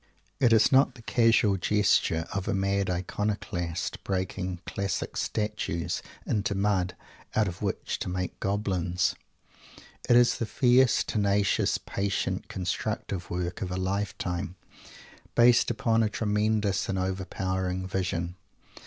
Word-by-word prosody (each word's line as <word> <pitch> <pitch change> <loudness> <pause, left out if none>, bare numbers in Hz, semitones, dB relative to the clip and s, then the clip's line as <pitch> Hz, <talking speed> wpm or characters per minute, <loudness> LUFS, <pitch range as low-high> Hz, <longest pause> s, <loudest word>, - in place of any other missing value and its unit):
It 120 -3 +4
is 110 -2 +5
not 135 -1 +4
the 120 - -14
casual 115 -4 +3
gesture 95 -4 +2
of 100 -2 -3
a - - +1
mad 100 0 0
iconoclast 90 -2 -3
breaking 95 -1 -2
Classic 100 -2 -3
Statues 90 -5 -2 0.2
into 105 -1 0
mud, 95 -2 +1 0.4
out 110 -2 +3
of 90 -1 -6
which 100 -2 -2
to - - -3
make 90 0 -3
goblins. 95 -3 0 1.0
It 120 - +7
is 120 0 +5
the 115 - -1
fierce, 125 +1 +4
tenacious, 100 -2 +1
patient, 100 -1 -2
constructive 90 -1 -3
work 90 +3 -3
of 95 - -2
a 90 - -3
lifetime, 95 -1 -2 0.8
based 120 0 +5
upon 115 -1 +2
a 110 - +2
tremendous 105 -2 0
and 95 - 0
overpowering 95 0 -2
Vision! 90 -2 -2
100 Hz, 125 wpm, -28 LUFS, 90-105 Hz, 1.0 s, It